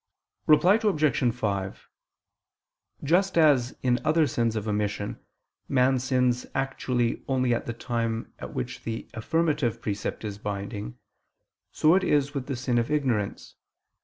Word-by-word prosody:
Reply 180 +7 +6
Obj. 155 - +2
5: 100 -5 -3 1.2
Just 180 +6 +2
as 140 -6 +4
in 125 -1 +2
other 155 0 +3
sins 115 -5 0
of 110 0 -3
omission, 105 -1 -2 0.5
man 130 -1 +3
sins 125 -1 +1
actually 130 -3 -1
only 130 -2 +1
at 120 - -2
the 120 - -2
time 115 -1 -3
at - - -7
which 60 0 -4
the 115 0 -5
affirmative 150 0 0
precept 105 +1 -4
is 105 -1 -5
binding, 100 - -5 0.7
so 155 +3 +4
is 145 -7 +2
it - - -18
with 135 -3 -4
the 140 - -2
sin 125 -1 0
of 115 - -1
ignorance. 130 -9 -1
125 Hz, 135 wpm, -26 LUFS, 110-145 Hz, 1.2 s, Reply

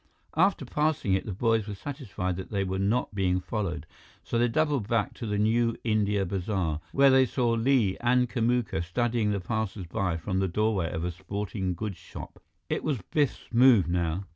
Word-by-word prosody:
After 175 -3 +2
passing 150 -6 0
it, 95 - 0
the - - -2
boys 110 +2 +1
were 105 - -5
satisfied 100 - -4
that 95 - -6
they 100 -2 0
were 95 0 -2
not 105 +4 0
being 95 -2 +1
followed, 90 -5 -3 0.4
so 115 - -1
they 120 - +4
doubled 145 -3 0
back 115 -3 0
to 115 - -6
the 105 -1 -1
New 115 +2 +2
India 105 -3 +1
Bazaar, 90 -4 -2
where 140 0 +5
they 130 0 +6
saw 120 -2 0
Li 115 -4 +2
and 125 +1 +3
Kamuka 120 -7 0
studying 115 +4 0
the 100 -1 0
passersby 95 -3 -2
from 95 +3 -2
the 95 - +1
doorway 100 -2 0
of 80 - -3
a 90 - -1
sporting 95 +1 -4
goods 105 +1 -4
shop. - - -10 0.3
It - - -2
was 150 -4 0
Biff's 145 -4 0
move 120 -7 +6
now. 85 +1 -1
105 Hz, 185 wpm, -28 LUFS, 95-120 Hz, 0.4 s, they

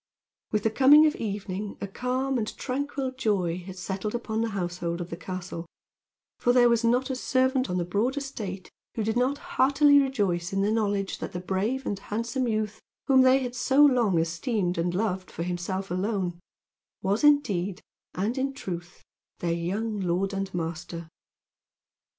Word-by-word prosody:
With 210 -1 0
the 220 - +2
coming 280 +6 +7
of 305 - +2
evening 200 -1 -4
a - - -3
calm 255 +5 -1
and 215 - -4
tranquil 275 0 -2
joy 195 -9 0
had 185 +1 -9
settled 195 +4 -3
upon 225 -2 -2
the 230 - 0
household 175 -3 -3
of 175 0 -6
the - - -3
castle; 175 -1 -6 0.7
for 245 - +3
there 245 -1 +6
was 235 -1 +2
not 250 +3 +2
a - - -1
servant 260 +1 +1
on 180 - -1
the 175 - 0
broad 215 +10 0
estate 210 -10 -5 0.2
who 225 - -1
did 220 +1 0
not 255 +3 +2
heartily 290 -4 +4
rejoice 200 -11 0
in 195 0 +1
the 205 - +2
knowledge 205 -3 0
that - - -5
the 180 - -3
brave 200 +9 -1
and 200 - -2
handsome 235 +5 -2
youth, 215 -2 -2 0.2
whom 265 -2 +5
they 260 +1 +5
had 245 -1 -4
so 270 +4 +4
long 240 -10 +3
esteemed 175 +2 0
and 175 +1 0
loved 190 -2 -1
for 165 - -5
himself 180 +2 -3
alone, 185 -2 -1 0.6
was 200 +6 +1
indeed 205 -11 +3 0.4
and 220 +8 -1
in 275 +1 -1
truth 175 -8 -7 0.3
their 170 -1 -1
young 205 +6 -2
lord 190 +2 0
and 195 0 -3
master. 170 -1 -5
210 Hz, 170 wpm, -27 LUFS, 180-255 Hz, 0.7 s, coming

